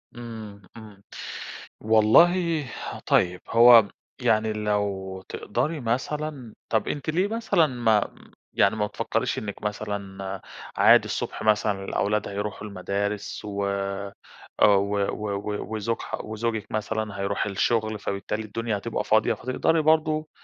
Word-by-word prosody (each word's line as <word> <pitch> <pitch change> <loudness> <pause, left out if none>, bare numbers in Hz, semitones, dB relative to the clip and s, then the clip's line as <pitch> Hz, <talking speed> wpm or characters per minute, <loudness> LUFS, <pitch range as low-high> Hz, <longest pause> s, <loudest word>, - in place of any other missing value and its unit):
إمم، 110 -4 -8 0.2
إمم. 105 -3 -13 0.8
والله 155 +10 +4 0.4
طيب، 90 0 +2
هو 115 -2 +8 0.3
يعني 110 0 +2
لو 100 -3 -2
تقدري 155 0 -2
مثلًا 130 +1 -3 0.2
طيب 110 -2 +1
أنتِ 145 +1 -3
ليه 180 +5 +2
مثلًا 220 -7 +2
ما 115 -5 +1 0.4
يعني 100 +2 +3
ما 105 -1 0
بتفكريش - - -2
إنِك 100 -1 -7
مثلًا، 100 -2 -4 0.4
عادي - - +6
الصبح - - -4
مثلًا 105 -2 +1
الأولاد 105 +2 0
هيروحوا 105 +1 -4
المدارس 100 +2 -3
و 100 -1 -5 1.0
و 100 0 +4
و 105 -1 -4
و 105 +2 -4
وزوج 110 +2 -2
ح - - -4
وزوجِك 110 0 -3
مثلًا 110 -1 -3
هيروح 100 +1 -1
للشغل، 110 +1 0
فبالتالي 100 +2 -3
الدنيا 110 +1 -3
هتبقى 115 +3 -3
فاضية، 110 +2 +3
فتقدري 130 +8 0
برضو 155 0 +2
110 Hz, 120 wpm, -25 LUFS, 100-120 Hz, 1.0 s, هو